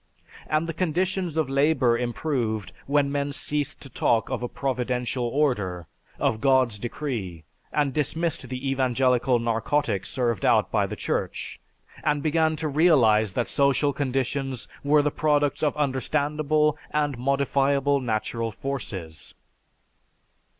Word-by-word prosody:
And 155 +1 +1
the 165 - -4
conditions 180 0 -1
of 155 -3 +1
labor 135 -3 +3
improved 120 -3 -2 0.2
when 140 0 +2
men 145 0 -1
ceased 145 +1 -2
to 135 - -10
talk 115 -2 +1
of - - -2
a 120 - -2
'Providential 125 -1 -2
Order,' 110 - 0 0.3
of 110 -1 0
'God's 130 -5 +3
Decree,' 115 - -4 0.3
and 145 -3 +1
dismissed 160 -1 -1
the 130 +1 -4
evangelical 130 -1 +2
narcotic 115 -2 0
served 120 -5 -1
out - - +3
by - - +2
the - - -5
Church, - - -3 0.4
and 145 -2 +1
began 160 0 +2
to 155 +1 -3
realize 125 - +4
that 120 - -1
social 140 +1 +2
conditions 135 -2 -2 0.2
were 145 +1 +4
the 150 - +1
products 145 -2 +1
of 150 -1 0
understandable 150 +2 +1
and 145 -4 -1
modifiable 140 +1 +2
natural 115 -1 -2
forces." 95 - -6
135 Hz, 130 wpm, -25 LUFS, 120-150 Hz, 0.4 s, realize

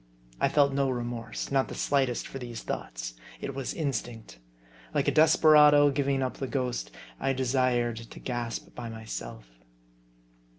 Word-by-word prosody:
I - - +3
felt 140 -2 +3
no 140 -1 +1
remorse, 120 -1 -4
not 135 -1 +2
the - - -7
slightest, 135 -4 +1
for 135 - -7
these 120 -2 -7
thoughts. - - -5 0.3
It 140 - -5
was 135 -1 -3
instinct. 120 - -4 0.6
Like - - +1
a - - +4
desperado 150 -2 +6
giving 135 -1 0
up 130 - -3
the 135 - -3
ghost, 125 - -2 0.3
I 135 - +1
desired 125 -2 +1
to 115 0 -10
gasp 120 -2 -4
by 120 -1 -6
myself. 110 - -7
130 Hz, 145 wpm, -28 LUFS, 120-140 Hz, 0.6 s, desperado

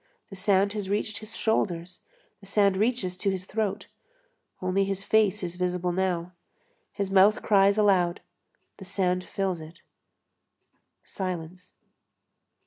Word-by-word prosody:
The - - -7
sand 195 +1 +2
has 205 -3 -4
reached 210 +1 -1
his 215 0 -9
shoulders, 180 -5 -1 0.4
the 195 - -14
sand 200 -1 +3
reaches 205 -3 0
to 200 - 0
his 185 -1 -3
throat; 205 -1 -2 0.7
only 185 +2 +1
his 195 0 -3
face 210 -1 +2
is 175 0 -5
visible 180 0 -1
now. 180 -1 -1 0.6
His 200 -1 -3
mouth 195 +2 +5
cries 200 0 +4
aloud, 185 -5 +3 0.6
the 190 - -10
sand 185 -1 0
fills 190 -4 -2
it; 160 +2 -12 1.2
silence. 180 -1 -6
195 Hz, 130 wpm, -27 LUFS, 180-205 Hz, 1.2 s, mouth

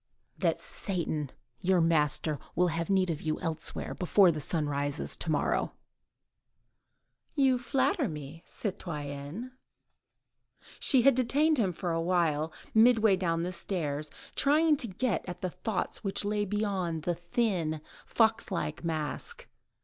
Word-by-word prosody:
"That - - 0
Satan, 160 - -3 0.3
your 185 0 +3
master, 155 -2 +2 0.2
will 180 +1 +3
have 165 +2 -2
need 190 -2 +3
of 155 - -4
you 155 -1 -2
elsewhere, 160 -2 -2
before 185 0 +4
the 155 -2 -4
sun 155 +1 -1
rises 145 +1 -2
to - - -3
day." 150 - +1 1.7
"You 265 -3 +3
flatter 270 - +1
me, 150 0 -7
citoyenne." 155 - -5 1.3
She 260 -4 +5
had 275 - +7
detained 280 +5 +3
him 195 -5 +2
for 175 +1 -3
a 165 0 0
while, 165 -3 +1 0.2
midway 220 -2 +5
down 170 -3 0
the 180 +1 -3
stairs, 155 -5 -2 0.2
trying 305 +2 +4
to 240 - 0
get 210 -1 -1
at 175 0 -7
the 185 - -2
thoughts 210 -1 -3
which 195 0 -2
lay 205 0 0
beyond 190 -6 -1
that 175 0 -1
thin, 175 -5 0 0.3
fox 225 0 +2
like 170 -5 -3
mask. 165 - -3
180 Hz, 135 wpm, -30 LUFS, 160-220 Hz, 1.7 s, had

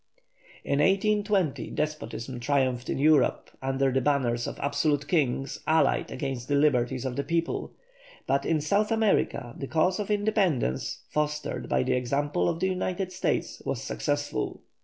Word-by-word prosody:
In 140 - 0
1820 195 -1 +2
despotism 145 -5 -4
triumphed 130 -1 0
in - - -1
Europe 150 0 +3
under 135 0 +1
the 130 +1 +1
banners 125 -4 +1
of - - -5
absolute 145 +1 0
kings 135 -5 0
allied 160 +1 +3
against 130 -2 -4
the 145 - +1
liberties 130 -3 +2
of 130 -1 -2
the 140 - -1
people, 165 +1 -2 0.5
but 140 0 +1
in 155 0 +1
South 200 +8 +1
America 200 - +1
the 135 - -4
cause 180 +6 +1
of 210 - -3
independence, 205 - 0
fostered 150 0 -2
by 65 0 +2
the - - +1
example 140 +7 0
of 165 -1 -2
the 190 - +1
United 185 0 -2
States, 185 - -2
was - - -3
successful. - - -2
145 Hz, 150 wpm, -27 LUFS, 130-175 Hz, 0.5 s, Europe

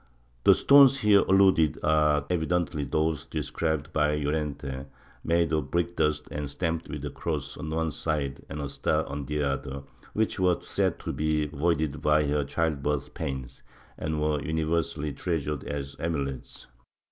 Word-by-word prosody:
The - - +8
stones 140 -1 +7
here 105 -1 +6
alluded 95 -6 +4
to - - -4
are 75 -2 +3
evidently 85 -2 0
those 80 0 -1
described 80 0 -2
by 75 -1 +2
Llorente, 70 -2 -3 0.4
made 85 0 +2
of 75 -3 0
brick 85 +2 0
dust 75 0 0
and 75 -1 -4
stamped 85 +2 -2
with 75 -2 -5
a 75 - -4
cross 70 -4 -3
on 75 - -6
one 80 0 -1
side 70 -3 -2
and 75 - -5
a 70 - -3
star 70 - 0
on 70 -1 -5
the 75 0 -1
other, 70 0 -3 0.3
which 110 -2 0
were 90 -2 +3
said - - 0
to - - -4
be 75 0 0
voided 75 0 -1
by 75 0 +3
her 75 0 +1
with 70 - -2
child 80 -4 0
birth 75 0 -2
pains, 65 -2 -5 0.3
and 80 0 -3
were 75 -1 0
universally 80 -2 -1
treasured 75 -4 -2
as 70 -1 -5
amulets. 70 -6 -4
75 Hz, 165 wpm, -27 LUFS, 70-80 Hz, 0.4 s, The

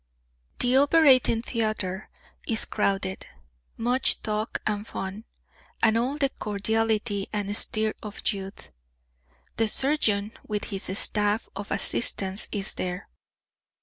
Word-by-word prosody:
The 250 +1 +3
operating 270 -6 +5
theatre 215 -5 -2 0.4
is 225 -1 +1
crowded; 195 -2 -1 0.5
much 245 +3 +1
talk 215 0 -2
and 210 0 -1
fun, 195 +4 -5 0.6
and 220 -1 +5
all 250 +5 0
the 275 -2 +2
cordiality 210 -1 0
and 205 -1 -2
stir 215 +1 +3
of 210 -1 -6
youth. 195 0 -8 0.9
The 225 - +3
surgeon 215 -5 +1
with 210 -1 -3
his 195 -1 -3
staff 210 +1 +2
of 200 0 -6
assistants 200 -1 +1
is 200 -2 -3
there. 180 0 -4
215 Hz, 115 wpm, -26 LUFS, 200-230 Hz, 0.9 s, operating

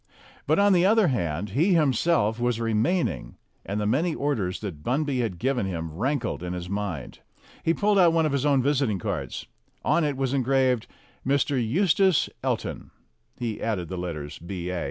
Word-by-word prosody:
But, - - +3
on 200 0 +5
the 175 -1 +4
other 210 -1 +4
hand, 90 - -2
he 165 - +3
himself 135 -6 +2
was 120 -1 0
remaining, 115 - 0 0.3
and 100 +2 -3
the 105 - -1
many 155 +10 +1
orders 115 -11 -1
that 90 -9 -6
Bunby 135 +1 0
had 110 -7 -2
given 125 -2 0
him 80 -4 -4
rankled 125 - -1
in 90 0 -4
his 90 0 -5
mind. 100 -8 -4 0.4
He 165 - +2
pulled 205 -1 +2
out 175 -2 +6
one 165 -1 +2
of 155 - 0
his 140 -1 0
own 140 -3 +3
visiting 135 -7 +1
cards. 90 - -4 0.4
On 170 - +3
it 145 -3 -1
was 135 -1 -1
engraved 130 -2 +2 0.4
"Mr. 140 +1 +1
Eustace 180 - +3
El - - +1
ton." - - -7 0.5
He 115 -3 -4
added 95 -7 -2
the 95 - -4
letters 80 -5 -5
B.A. 90 0 -4
120 Hz, 175 wpm, -26 LUFS, 95-145 Hz, 0.5 s, out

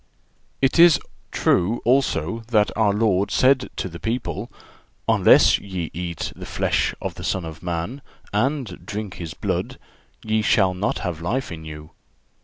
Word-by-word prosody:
It 135 +5 +3
is 170 -3 +8 0.3
true 95 +7 +2
also 115 - +1
that 110 -3 +2
our 110 -2 +3
Lord 100 -2 +1
said 130 0 +3
to - - -3
the 85 -2 -9
people: 115 +5 -3 0.6
"Unless - - +6
ye 95 -5 -5
eat 85 -1 -4
the - - -9
flesh - - 0
of - - -4
the - - -9
Son 95 -3 -1
of 80 0 -8
man, 90 +10 -4 0.3
and 120 -2 -1
drink 105 -2 -5
His 85 -3 -6
blood, - - -3 0.5
ye 110 0 +1
shall 95 -4 +3
not 95 +3 -1
have 85 -3 -3
life 120 +9 -2
in 80 -1 -8
you." 75 0 -9
100 Hz, 155 wpm, -23 LUFS, 85-115 Hz, 0.6 s, is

